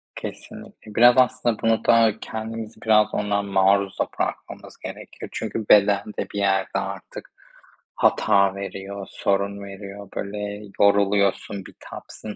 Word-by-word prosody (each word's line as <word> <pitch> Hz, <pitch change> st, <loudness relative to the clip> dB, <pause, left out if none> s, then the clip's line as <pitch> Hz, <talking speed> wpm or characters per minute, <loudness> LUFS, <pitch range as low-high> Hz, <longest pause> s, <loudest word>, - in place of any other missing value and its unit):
Kesinlikle. 105 Hz, -1 st, -10 dB
Biraz 120 Hz, +2 st, +7 dB
aslında 125 Hz, -3 st, +2 dB
bunu 115 Hz, 0 st, +1 dB
da 115 Hz, -2 st, +4 dB
kendimizi 110 Hz, 0 st, -6 dB
biraz 105 Hz, -1 st, +3 dB
ona 100 Hz, -1 st, 0 dB
maruz 100 Hz, 0 st, +2 dB
da -, -, +1 dB
bırakmamız -, -, -5 dB
gerekiyor. -, -, -9 dB
Çünkü 110 Hz, -2 st, -4 dB
beden 100 Hz, -1 st, +5 dB
de -, -, -2 dB
bir 100 Hz, -, -2 dB
yerde 95 Hz, -1 st, +1 dB
artık 95 Hz, 0 st, -7 dB, 0.6 s
hata 100 Hz, -1 st, +3 dB
veriyor, 100 Hz, 0 st, -6 dB
sorun 100 Hz, 0 st, -1 dB
veriyor. 100 Hz, 0 st, -9 dB
Böyle 105 Hz, +1 st, -5 dB, 0.2 s
yoruluyorsun, 100 Hz, -1 st, +2 dB
bitapsın 105 Hz, -1 st, -10 dB
100 Hz, 120 wpm, -23 LUFS, 100-110 Hz, 0.6 s, Biraz